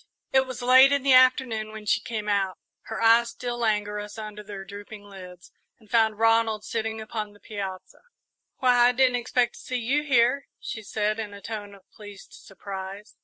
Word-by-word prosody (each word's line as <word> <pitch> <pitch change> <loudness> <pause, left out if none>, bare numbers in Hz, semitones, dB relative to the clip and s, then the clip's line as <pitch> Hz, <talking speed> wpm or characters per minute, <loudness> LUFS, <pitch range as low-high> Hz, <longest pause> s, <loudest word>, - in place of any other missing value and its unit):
It 265 0 +4
was 255 -1 -7
late 260 +2 +7
in 280 -2 +1
the 275 -1 +4
afternoon 255 -4 +4
when 215 -1 -9
she 210 - +2
came 220 -5 -5
out, 195 -2 0 0.3
her 225 - -5
eyes 230 +1 +5
still 240 0 -5
languorous 210 -2 -2
under 210 -1 -7
their 200 -2 -9
drooping 205 +1 -10
lids, 185 -3 -12 0.3
and 215 -3 -23
found 220 -2 +3
Ronald 225 -1 +2
sitting 225 0 -3
alone 220 - -6
upon 215 -1 -5
the 205 - -20
piazza. 195 -4 -7 0.6
"Why, 245 -1 +4
I 250 - +2
didn't 250 -1 +3
expect 240 0 0
to - - -13
see 255 - -3
you 265 +6 0
here," 265 -1 +2
she 220 - -6
said, 215 +1 -2
in 210 -2 -5
a - - -10
tone 205 -2 -7
of 195 - -21
pleased 205 -2 -13
surprise. 195 +1 -9
220 Hz, 190 wpm, -25 LUFS, 205-245 Hz, 0.6 s, late